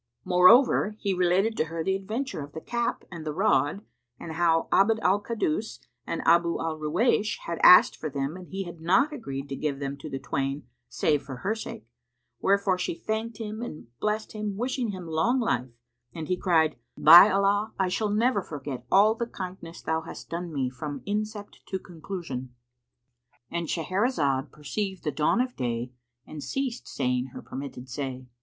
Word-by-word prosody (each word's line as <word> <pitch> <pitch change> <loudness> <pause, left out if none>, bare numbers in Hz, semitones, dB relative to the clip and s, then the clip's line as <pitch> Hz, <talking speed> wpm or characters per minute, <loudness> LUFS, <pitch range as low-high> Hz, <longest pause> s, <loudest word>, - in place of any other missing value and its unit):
Moreover, 210 +4 +5
he 200 -2 0
related 185 +5 +2
to - - +2
her 165 +1 -4
the 190 +3 +1
adventure 215 - -4
of 145 +1 -9
the 160 - -5
cap 235 +7 -2
and 170 -3 -7
the 155 - -3
rod 150 +6 +1 0.3
and 165 - -7
how 165 0 +2
Abd 220 +3 +4
al 195 +3 +3
Kaddus 210 - -2 0.3
and 165 - -3
Abu 170 +1 +4
al 160 -1 -3
Ruwaysh 210 +7 +1
had 170 0 -3
asked 180 - +8
for 155 - -5
them 140 +2 -3
and 185 -1 -10
he 195 0 -4
had 175 -2 -10
not 260 - +3
agreed 140 - -5
to 135 - -3
give 145 -1 -2
them 140 0 -4
to 145 +2 -8
the 135 - -4
twain 135 +2 -2 0.3
save 150 -2 +1
for 140 -2 -8
her 205 - +2
sake; 220 - -7 0.5
wherefore 195 -2 +2
she 180 - -2
thanked 220 +3 -3
him 220 0 -5
and 155 - -7
blessed 215 0 -1
him 210 -2 -4
wishing 245 0 -1
him 185 -3 -6
long 165 +11 +1
life; 125 - 0 0.5
and 160 -1 -6
he 180 - +2
cried, 160 -4 +2 0.2
"By 175 +6 +10
Allah, 200 +2 +2
I 190 - +1
shall 205 +4 -1
never 215 +1 +2
forget 145 -6 -7
all 210 +3 +6
the 235 +1 -3
kindness 180 -5 -8
thou 160 0 0
hast 165 - -10
done 170 0 -4
me 135 -4 -1
from 140 +2 -6
incept 210 0 -4
to 190 - -2
conclusion."—And 125 -4 -9
Shahrazad 160 - 0
perceived 190 +6 -4
the 150 - -1
dawn 150 - +1
of 250 0 -1
day 120 -1 -2 0.3
and 155 - -8
ceased 260 - -3
saying 125 0 -1
her - - -8
permitted 130 -1 -7
say. 130 -1 -5
170 Hz, 175 wpm, -27 LUFS, 145-210 Hz, 0.5 s, By